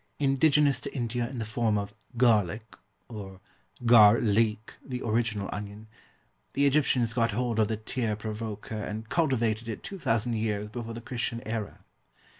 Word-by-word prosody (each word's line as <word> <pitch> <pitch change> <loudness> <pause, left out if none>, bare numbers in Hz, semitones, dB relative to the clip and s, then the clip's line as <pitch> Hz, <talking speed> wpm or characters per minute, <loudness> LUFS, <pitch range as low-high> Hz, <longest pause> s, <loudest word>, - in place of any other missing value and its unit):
Indigenous 140 0 +3
to - - -7
India 120 -1 -2
in 130 - -7
the 115 - -3
form 110 -1 0
of 100 0 -4 0.2
Garlic 110 -3 +2 0.3
(or 100 -4 -8 0.5
gar 115 -2 +8
leek, 110 0 +1
the 125 -2 -5
original 110 -3 0
onion), 105 +1 -7 0.7
the 140 - +2
Egyptians 130 -5 +2
got 115 -2 +1
hold 120 0 -1
of 110 - +4
the 110 0 -2
tear 110 0 -2
provoker 110 0 -5
and 110 +2 -6
cultivated 120 -8 +1
it 110 - -5
2000 120 - -1
years 105 -2 -2
before 115 0 -6
the 115 - -7
Christian 120 0 -3
era. 110 -3 -4
115 Hz, 150 wpm, -28 LUFS, 105-120 Hz, 0.7 s, gar